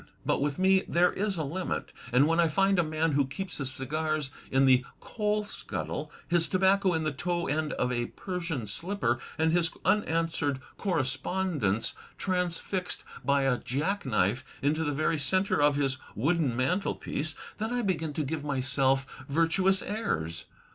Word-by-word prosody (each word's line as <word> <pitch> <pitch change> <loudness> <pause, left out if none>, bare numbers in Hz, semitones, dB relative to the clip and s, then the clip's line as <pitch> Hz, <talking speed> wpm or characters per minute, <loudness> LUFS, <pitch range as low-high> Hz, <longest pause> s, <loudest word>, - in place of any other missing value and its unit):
But - - +1
with 145 0 0
me 190 0 +4
there 175 +1 +3
is 200 -2 -1
a 160 - -1
limit, 175 +6 -3 0.2
and 125 +4 +5
when 165 +2 +2
I 170 - +5
find 195 +4 +3
a - - +4
man 155 +1 0
who 140 -1 +2
keeps 180 +7 -5
his 135 -2 -2
cigars 150 +2 -1 0.2
in 135 0 +4
the 130 -1 +5 0.2
coal 210 -1 -1
scuttle, 150 -6 -4 0.2
his 170 -1 +3
tobacco 190 -1 +3
in 160 - 0
the 155 - 0
toe 175 +4 -2
end 155 +1 -1
of 125 - 0
a 120 -1 -1
Persian 170 - -4
slipper, 145 - -1 0.2
and 160 0 +3
his 170 -1 +3 0.2
unanswered 165 -8 +1 0.2
correspondence 150 - 0 0.2
transfbced 180 0 -2 0.2
by 140 +1 +3
a 135 -2 +2
jack 160 +11 -1
knife 115 0 +1 0.2
into 155 +3 +2
the 145 - 0
very 155 +2 0
centre 185 +5 +2
of 145 0 +4
his 135 -2 +1 0.2
Wooden 145 0 +1
mantelpiece, 155 +1 -1 0.2
then 220 +2 -2
I 245 -1 0
begin 165 -6 0
to 155 - -1
give 150 +2 -3
my^f 135 -1 +1 0.2
virtuous 175 +5 +3
airs. 85 - -2
155 Hz, 160 wpm, -29 LUFS, 135-180 Hz, 0.2 s, and